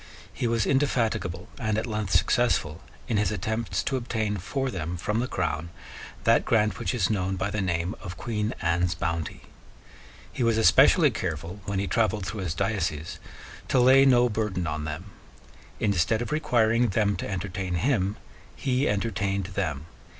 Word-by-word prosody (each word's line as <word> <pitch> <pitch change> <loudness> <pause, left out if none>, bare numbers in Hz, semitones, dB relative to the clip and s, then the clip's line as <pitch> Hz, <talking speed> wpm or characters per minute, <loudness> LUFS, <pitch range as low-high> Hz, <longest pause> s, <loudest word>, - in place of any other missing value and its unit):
He 120 - -1
was 115 -2 +1
indefatigable 115 -10 0
and 110 -3 0
at 110 - -1
length 105 -4 -3
successful 90 -5 +2 0.3
in 110 - 0
his 105 -1 +1
attempts 105 -1 -2
to 135 - -1
obtain 110 -4 -2
for 130 +8 -2
them 90 -2 -4
from 105 +6 -1
the 125 - -1
Crown 85 - -2 0.5
that - - +4
grant 105 -2 +1
which - - -1
is 110 -3 +1
known 95 -2 0
by 95 +2 -2
the 105 - -1
name 90 0 -1
of 90 -4 -7
Queen 110 0 -2
Anne's 85 +1 +1
Bounty. 85 -2 -3 0.9
He - - -4
was 115 -2 +3
especially 110 - +6
careful, 85 +2 -4
when 100 -1 -2
he 100 - 0
travelled 105 +1 0
through 100 +2 -5
his 90 -3 -3
diocese, 85 -7 -2 0.5
to 130 - +2
lay 130 +2 +7
no 125 -2 +5
burden 105 -5 -2
on 75 -1 -3
them. 80 +6 -6 0.7
Instead 100 +3 +1
of - - -7
requiring 120 -5 +2
them 105 -1 +1
to - - -4
entertain 95 -1 -3
him, 100 0 +1 0.4
he 130 0 0
entertained 100 -2 -1
them. 75 -7 -2
105 Hz, 165 wpm, -26 LUFS, 90-115 Hz, 0.9 s, lay